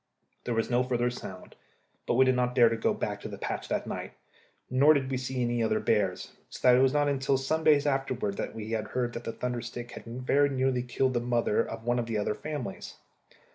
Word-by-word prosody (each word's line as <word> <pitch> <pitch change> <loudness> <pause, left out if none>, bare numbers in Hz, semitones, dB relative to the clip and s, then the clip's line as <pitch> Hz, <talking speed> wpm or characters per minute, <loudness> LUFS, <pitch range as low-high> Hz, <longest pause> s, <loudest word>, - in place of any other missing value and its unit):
There 120 - -1
was 115 +2 -1
no 120 +1 +3
further 125 -1 0
sound, 95 -6 -9 0.5
but - - +1
we 130 +2 +6
did 130 - +4
not 125 0 0
dare 120 -3 +6
to 115 - -1
go 115 - +1
back - - -3
to - - -6
the - - -7
patch - - -4
that - - -1
night, - - -5 0.5
nor 140 +5 +5
did 135 -1 -1
we 130 - 0
see 130 0 -2
any 120 0 0
of 110 - +1
the - - +2
other - - +1
bears; 95 -3 0 0.2
so - - -9
that 125 - +8
it 125 - +4
was 135 0 +4
not 145 0 +2
until 135 -1 +1
some 155 +4 -1
days 150 -2 +5
afterwards 135 -7 -1
that - - -4
we 110 0 -6
heard 120 +2 -2
that 120 - -6
the - - -2
thunder 125 0 -3
stick 120 0 -7
had - - -10
very 130 +4 +1
nearly 130 -2 +1
killed 130 +1 0
the 120 - +1
mother 120 -2 +1
of 115 0 -7
one 120 +1 +1
of 115 - -2
the 115 -2 -1
other 105 0 0
families. 145 -9 -6
125 Hz, 245 wpm, -29 LUFS, 115-130 Hz, 0.5 s, that